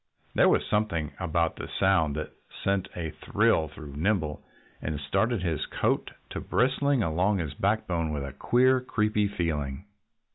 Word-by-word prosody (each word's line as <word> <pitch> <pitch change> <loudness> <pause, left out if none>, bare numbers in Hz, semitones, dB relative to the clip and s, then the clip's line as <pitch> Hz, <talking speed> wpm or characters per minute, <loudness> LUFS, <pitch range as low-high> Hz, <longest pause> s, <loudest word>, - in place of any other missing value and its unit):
There - - +5
was - - +3
something 90 -8 0
about 85 -2 0
the - - -6
sound 85 -7 +3
that 80 - -4 0.3
sent 100 -1 0
a 80 -3 -3
thrill 80 +1 +2
through 75 -2 -10
Nimble 80 -3 0 0.4
and 75 -2 -3
started 105 - 0
his 80 -4 -1
coat - - 0 0.2
to - - -4
bristling 135 +4 +2
along 90 +5 +1
his 80 -5 -3
backbone 85 -3 0
with 70 -2 -3
a 70 - -7
queer, 130 +1 +3
creepy 105 -4 +1
feeling. 80 -6 -2
85 Hz, 150 wpm, -28 LUFS, 75-105 Hz, 0.4 s, There